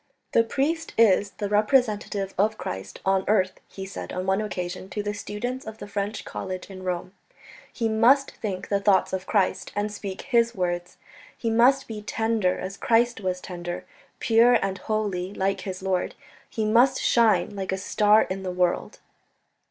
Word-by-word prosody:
"The 230 - +5
priest 300 +8 -1
is 205 -2 +5
the 205 - -2
representative 210 -2 +1
of 215 +3 +1
Christ 95 - -6
on 190 0 +2
earth," 190 -3 +2
he 190 - -8
said 195 - -7
on 185 0 -3
one 190 +2 +1
occasion 185 -2 -5
to 210 - -3
the 205 0 -2
students 245 +5 -4
of 220 0 -7
the - - -8
French 205 +1 -3
College 185 +1 -6
in 185 -1 -9
Rome; 180 0 -3 0.6
"he 230 - -1
must 240 +6 +4
think 195 -4 -5
the 200 - +2
thoughts 200 -2 +3
of 190 0 -3
Christ 200 -4 +1
and 205 +1 -1
speak 200 -2 -6
His 235 -3 +2
words. 175 -1 -2 0.4
He 230 - -1
must 260 +4 +4
be 215 -2 -6
tender 220 -3 0
as 190 +1 -6
Christ 235 0 +2
was 185 -1 -1
tender, 175 -1 -6 0.3
pure 230 +2 +5
and 195 0 -2
holy 205 -3 -2
like 195 +1 0
his 190 -2 -6
Lord; 185 -2 -1 0.3
he 220 -2 -2
must 245 +5 +4
shine 225 -3 +3
like 190 -1 -3
a 190 - 0
star 210 +2 +4
in 190 +1 -4
the 190 - -4
world." 180 -1 0
205 Hz, 175 wpm, -25 LUFS, 190-225 Hz, 0.6 s, The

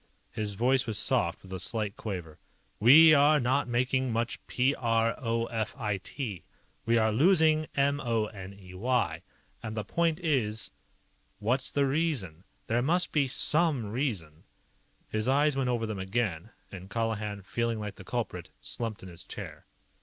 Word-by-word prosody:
His 105 -2 -3
voice 130 +4 +2
was 110 -2 0
soft, 85 -3 +1
with 95 -1 -10
a 95 - -4
slight 105 +1 -2
quaver. 90 -8 -6 0.4
"We 155 +8 +9
are 150 +1 +5
not 130 +2 +1
making 130 +1 0
much 115 +1 -1
p 130 +3 +2
r 115 -3 +1
o 115 -1 -1
f 115 -2 -3
i 105 -1 -1
t. 105 - -6 0.4
We 115 +1 +4
are 110 -1 +3
losing 155 - +4
m 140 +1 +2
o 115 -5 0
n 100 -2 -9
e 90 -2 -13
y. 120 +6 0 0.4
And 110 0 -6
the 105 - -1
point 165 - 0
is 120 -10 0 0.7
what's 125 +6 0
the 140 -1 +1
reason? 135 - -1 0.2
There 120 +2 +1
must 175 +7 +1
be 145 -3 +2
some 145 -5 +1
reason." 105 - -3 0.6
His 110 +1 -2
eyes 145 +2 +3
went 135 -2 0
over 120 -2 0
them 110 -3 -4
again, 95 -2 -2 0.2
and 95 -1 -9
Colihan, 105 -2 -2
feeling 115 +3 -1
like 105 -1 -5
the - - -10
culprit, - - -4
slumped 115 -4 -4
in 95 - -9
his 85 0 -11
chair. - - -9
115 Hz, 165 wpm, -29 LUFS, 105-135 Hz, 0.7 s, We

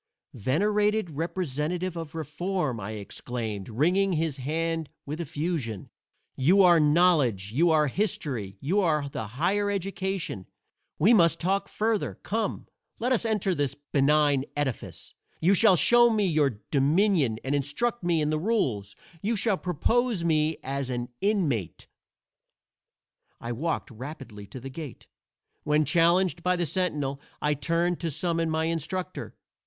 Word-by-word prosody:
"Venerated 205 - +1
representative 170 +2 -2
of 165 -2 -7
Reform," 160 -4 -2
I 105 +2 -5
exclaimed, 110 0 -5
wringing 180 - +2
his 160 -3 -1
hand 160 +3 -2 0.2
with 150 +4 -4
effusion, 150 - -3 0.4
"you 180 +9 +4
are 175 -2 +6
Knowledge, 150 - +3
you 165 +9 +3
are 155 -2 +4
History, 130 - -2
you 175 +9 +1
are 150 -5 +1
the 140 -6 -5
Higher 205 +6 +1
Education! 190 - -3 0.5
We 205 +10 +5
must 170 -5 +4
talk 195 +3 0
further. 220 -1 -1
Come, 220 -1 -2 0.3
let 245 +3 -1
us 240 -2 +2
enter 210 -4 +1
this 145 -5 -1
benign 145 -1 +2
edifice; 145 -5 -4 0.3
you 180 +5 +4
shall 200 0 +6
show 240 +7 +6
me 215 -3 +1
your 145 - +1
dominion 150 - +2
and 135 - -2
instruct 145 - -1
me 170 -2 +2
in 150 0 0
the 155 - 0
rules. 130 - -1 0.3
You 225 +3 0
shall 210 0 +2
propose 210 - 0
me 155 -1 +1
as 135 0 -3
an 120 -1 -3
inmate." 165 - -1 1.5
I 120 - -5
walked 150 +4 -2
rapidly 120 -4 -9
to 130 - -9
the 135 +2 -8
gate. 145 -2 -8 0.6
When 150 +1 +2
challenged 170 +2 +3
by 180 +1 +1
the 175 -1 0
sentinel, 145 -5 -1 0.2
I 150 0 +1
turned 170 +5 0
to 170 - -2
summon 165 +2 -1
my 160 0 0
instructor. 170 +3 -3
160 Hz, 140 wpm, -27 LUFS, 140-185 Hz, 1.5 s, are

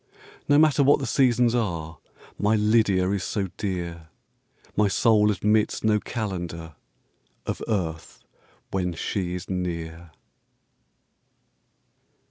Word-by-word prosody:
No 145 - +6
matter 155 -2 +4
what 140 +1 +5
the 140 - -4
Seasons 125 -2 +3
are, 85 - -2 0.4
My 105 +2 +3
LYDIA 105 -3 +3
is 100 -2 -1
so 100 -3 -2
dear, 85 -4 -4 0.7
My 105 0 +3
soul 105 +1 +3
admits 105 +1 +1
no 110 -1 +3
Calendar 85 -8 -5 0.7
Of - - -4
earth 85 -7 -3 0.5
when 90 -2 -1
she 90 +2 -3
is 90 - -7
near. 85 -2 -4
100 Hz, 105 wpm, -25 LUFS, 85-110 Hz, 0.7 s, No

